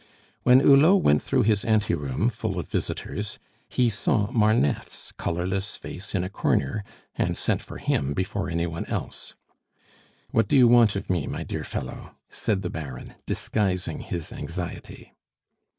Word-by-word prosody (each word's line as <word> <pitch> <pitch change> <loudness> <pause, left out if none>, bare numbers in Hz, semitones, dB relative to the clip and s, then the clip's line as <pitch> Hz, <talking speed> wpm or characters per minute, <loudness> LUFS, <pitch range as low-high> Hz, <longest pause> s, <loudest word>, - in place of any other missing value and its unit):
When 125 +1 +6
Hulot 155 +8 +6
went 75 - +4
through - - +1
his 105 -1 +2
anteroom, 100 - +1
full 105 -6 -3
of 85 - -3
visitors, 105 0 -3 0.3
he 125 - +2
saw 105 0 0
Marneffe's 110 - +1
colorless 95 +4 -2
face 95 +3 -7
in 90 - +1
a - - -2
corner, 100 0 0 0.3
and - - 0
sent - - 0
for - - -9
him 70 0 0
before 95 +1 -2
any 85 0 0
one 85 0 -4
else. - - -5 1.0
"What 110 -2 +2
do 140 - +3
you 125 -2 +7
want 115 -3 +6
of 100 - -4
me, 85 -6 0
my - - -4
dear - - -4
fellow?" - - -6 0.2
said 100 -3 -1
the 90 - -2
Baron, 70 -6 -7
disguising 95 -4 -1
his 85 -3 -5
anxiety. 85 0 -6
100 Hz, 150 wpm, -25 LUFS, 85-110 Hz, 1.0 s, you